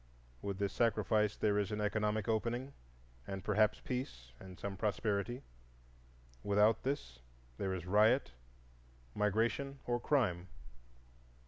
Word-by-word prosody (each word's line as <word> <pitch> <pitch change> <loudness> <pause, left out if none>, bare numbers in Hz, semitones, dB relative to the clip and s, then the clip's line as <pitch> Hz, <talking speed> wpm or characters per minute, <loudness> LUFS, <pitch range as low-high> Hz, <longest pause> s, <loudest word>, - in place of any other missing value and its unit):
With 100 -1 -3
this 100 -1 -1
sacrifice 110 -2 +2
there 105 -1 +2
is 105 +1 -1
an 105 - -2
economic 105 +1 0
opening, 120 +4 -1 0.5
and 95 -1 -5
perhaps 105 0 +2
peace 60 - -5
and 95 -1 -11
some 100 -1 -4
prosperity. 105 +4 -1 1.0
Without 105 +2 +4
this 65 - -3 0.4
there 95 -1 -1
is 90 -2 -6
riot, 105 - +4 0.8
migration, 115 +7 0
or 120 0 0
crime. 105 -11 +1
105 Hz, 115 wpm, -35 LUFS, 100-115 Hz, 1.0 s, Without